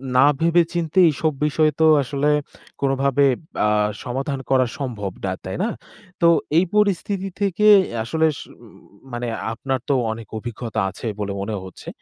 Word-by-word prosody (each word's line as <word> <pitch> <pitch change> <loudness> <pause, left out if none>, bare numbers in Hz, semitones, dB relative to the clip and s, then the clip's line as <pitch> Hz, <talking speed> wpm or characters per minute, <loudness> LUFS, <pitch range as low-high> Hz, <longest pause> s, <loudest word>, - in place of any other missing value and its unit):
না 130 +2 +6
ভেবে-চিন্তে 170 +1 +1
এইসব 155 +2 0
বিষয় 155 +1 +2
তো 160 - +5 0.2
আসলে 140 +2 -1 0.5
কোনভাবে 140 0 +2 0.4
আ - - +3 0.4
সমাধান 135 +2 -3
করা 130 -1 +4
সম্ভব 115 -9 -4
না, 95 - -1
তাই 95 - -4
না? 230 - 0 0.5
তো 170 - +6 0.3
এই 180 - +4
পরিস্থিতি 200 -1 +1
থেকে 200 +1 +1 0.2
এ - - -9
আসলে 160 +8 0
স - - -7 0.2
উম - - -16 0.4
মানে 120 0 -3 0.3
আপনার 130 +3 -2
তো 140 - +3 0.2
অনেক 110 -1 -7
অভিজ্ঞতা 115 -1 -4
আছে 100 +5 -7
বলে 100 -1 -2
মনে 105 +2 -3
হচ্ছে। 95 - -12
135 Hz, 155 wpm, -21 LUFS, 120-165 Hz, 0.5 s, না